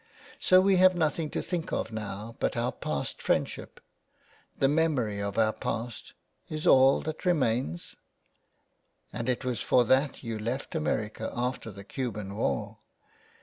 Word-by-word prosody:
So 185 0 +6
we 195 0 +4
have 185 0 +6
nothing 155 -1 0
to - - -3
think 175 -3 -3
of 110 - -2
now 110 +1 -6
but - - 0
our - - 0
past - - -4
friendship. - - -1 0.8
The 135 - +3
memory 140 -9 +1
of 100 0 -3
our 110 -1 +3
past 115 0 -5 0.2
— - - -42
is 155 0 -4
all 135 +1 +6
that 155 0 -5
remains? 125 - 0 1.2
And 115 +2 -3
it 130 +1 -1
was 125 -2 -1
for 125 -1 +4
that 135 +5 +2
you 115 -2 -4
left 120 +5 -3
America 110 -9 -2
after 125 -1 -2
the 100 -1 -10
Cuban 105 -4 -4
war 110 - -2
125 Hz, 150 wpm, -29 LUFS, 110-155 Hz, 1.2 s, So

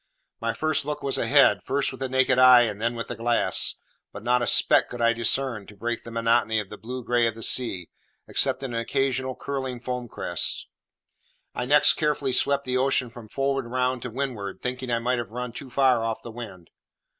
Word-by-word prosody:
My - - -1
first 155 -2 -1
look 150 +1 -5
was 135 -1 0
ahead, 140 0 +4
first 140 +1 -1
with 130 - -10
the 135 -1 -3
naked 130 0 +2
eye, 130 -1 +8
and 105 -3 -2
then 120 +1 0
with 115 - -5
the 120 - -4
glass; 115 +1 +1 0.4
but 100 - -10
not 125 +1 +2
a 120 - -1
speck - - +4
could 120 - -7
I 115 0 +3
discern 115 -1 -1
to 105 - -13
break 120 +3 -3
the - - -10
monotony 115 -1 +1
of 105 -3 -6
the 105 - -9
blue 125 +4 -6
grey 120 0 +2
of 115 - -3
the 115 - -8
sea, 95 -10 0 0.4
except - - +1
an 130 -3 -4
occasional 130 +2 -1
curling 130 -3 -4
foam 125 0 -4
crest. - - -2 0.9
I 125 - -3
next 145 +3 +5
carefully 145 -3 -1
swept 140 +1 +2
the 130 -1 -1
ocean 130 -2 +1
from 115 -2 -11
forward 135 -1 -1
round 125 +1 -1
to 125 - -5
windward, 115 -6 -4
thinking 125 0 -4
I 120 - +1
might 120 +1 0
have 120 - -5
run 125 +2 -5
too 130 +3 -9
far 130 -3 +3
off 115 -1 -3
the 115 - -8
wind. 105 -7 -10
125 Hz, 210 wpm, -25 LUFS, 115-130 Hz, 0.9 s, eye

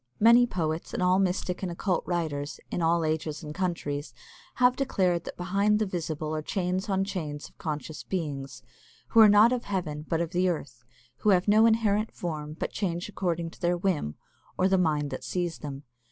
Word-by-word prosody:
Many 235 +3 +7
poets, 160 -5 -3
and - - 0
all 180 +1 +4
mystic 180 -1 -1
and 185 -2 -2
occult 180 +1 -1
writers, 155 -5 -2
in - - -1
all 165 0 +2
ages 155 0 -2
and 150 -1 -6
countries, 155 -5 -3 0.4
have 250 0 +4
declared 185 -10 0
that - - -7
behind 200 +4 +2
the 215 - +1
visible 160 -4 -3
are 155 - -1
chains 185 +4 -2
on 195 -1 +2
chains 155 -7 -4
of - - -24
conscious 155 -1 -4
beings, 145 -7 -4 0.5
who 230 - +4
are 220 -1 +9
not 210 +4 +6
of 245 -1 -2
heaven 165 -7 -3
but 165 - +1
of 170 -1 -2
the 180 0 +2
earth, 130 -8 -5 0.3
who 215 - +1
have 185 -1 +4
no 215 +2 +6
inherent 220 -1 +2
form 155 -3 -4
but - - -3
change 175 -2 -2
according 170 -4 -2
to - - -18
their 175 0 +2
whim, 170 - -1 0.4
or 185 - +3
the 190 - +3
mind 150 -4 +1
that - - -5
sees 175 -2 -2
them. 140 -1 -7
175 Hz, 195 wpm, -28 LUFS, 155-195 Hz, 0.5 s, are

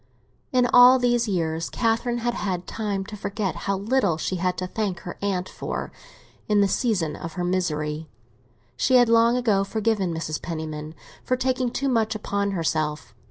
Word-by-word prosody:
In 250 -1 +3
all 250 +1 +9
these 240 -2 +2
years 165 -4 -1
Catherine 230 +1 0
had 240 0 -1
had 185 -6 -3
time 200 -3 -3
to 210 - -8
forget 200 -2 -3
how 195 - +2
little 205 -5 +1
she 185 +3 -2
had 180 +1 -1
to 185 - -2
thank 190 -2 -3
her 175 - -7
aunt 190 -2 -1
for - - -5 0.6
in 210 -1 +3
the 200 - +4
season 185 - 0
of 165 - -7
her 180 - -3
misery; 155 -4 -1 0.7
she 260 - +2
had 245 -2 +6
long 230 +1 +5
ago 215 -6 +2
forgiven 210 -3 0
Mrs. 160 -2 -3
Penniman 155 -2 -5 0.3
for 255 - 0
taking 255 -1 0
too 275 +3 -2
much 225 -4 +1
upon 200 -1 -1
herself. 155 - -2
200 Hz, 170 wpm, -24 LUFS, 170-230 Hz, 0.7 s, all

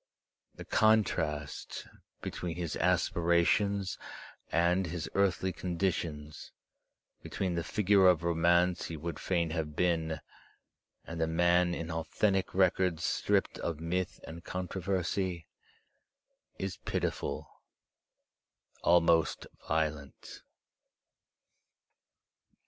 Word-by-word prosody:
The - - -9
contrast 80 -10 +1 0.4
between 85 -2 -4
his 85 -3 -3
aspirations 90 +3 +2 0.5
and 90 +2 +2
his 85 0 -4
earthly 95 -1 +1
conditions, 85 -5 -3 0.7
between 95 -2 -2
the 85 -1 -1
figure 100 -1 +4
of 90 -2 +4
romance 85 +1 +3
he 80 - -5
would 80 0 -5
fain 85 -3 0
have 80 -2 -3
been 80 -3 0 0.9
and 85 0 -5
the 80 - +2
man 85 +1 +3
in 85 -1 -5
authentic 95 +5 0
records 90 -3 +2
stripped - - +1
of 85 -3 -3
myth 90 +3 -2
and 85 +1 -9
controversy, 90 -1 -2 1.1
is 95 -1 -4
pitiful, - - -3 1.2
almost 85 -1 +3 0.2
violent. 75 -2 -3
85 Hz, 90 wpm, -31 LUFS, 80-95 Hz, 1.2 s, figure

